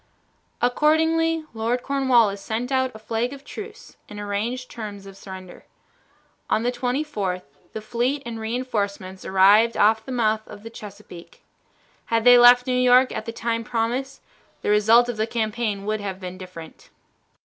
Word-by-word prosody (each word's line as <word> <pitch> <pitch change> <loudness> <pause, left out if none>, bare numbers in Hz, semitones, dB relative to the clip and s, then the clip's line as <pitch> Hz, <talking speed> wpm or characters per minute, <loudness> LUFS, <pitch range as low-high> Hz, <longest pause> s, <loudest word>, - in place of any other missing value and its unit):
Accordingly 320 +4 +2
Lord 230 +2 -1
Cornwallis 245 -7 +2
sent 230 +5 -4
out 260 -1 +1
a - - -7
flag 225 +3 -3
of 280 0 -12
truce 430 +5 -10
and 205 - -8
arranged 215 +5 -3
terms 205 -3 -8
of 195 -1 -11
surrender. 190 -2 -11 0.9
On 220 - +1
the 245 - +1
24th 245 -8 -2 0.3
the 220 - -5
fleet 245 +6 -1
and 230 -1 -6
re 220 +2 -3
enforcements 200 -6 -4
arrived 205 +5 +4
off 220 +1 +3
the 260 - -8
mouth 220 -3 +1
of 205 - -12
the 225 - -9
Chesapeake. 200 -5 -12 0.6
Had 230 -1 0
they 245 0 +8
left 245 0 +7
New 255 - -1
York 250 +1 +4
at 220 - -5
the - - -2
time 230 0 -2
promised, 245 +4 -3 0.4
the - - +1
result 220 +3 +5
of 240 -2 -4
the 220 +1 0
campaign 220 -3 -2
would 215 0 -2
have 195 -2 -5
been 180 -1 -7
different. 175 -4 -11
230 Hz, 160 wpm, -23 LUFS, 205-250 Hz, 0.9 s, they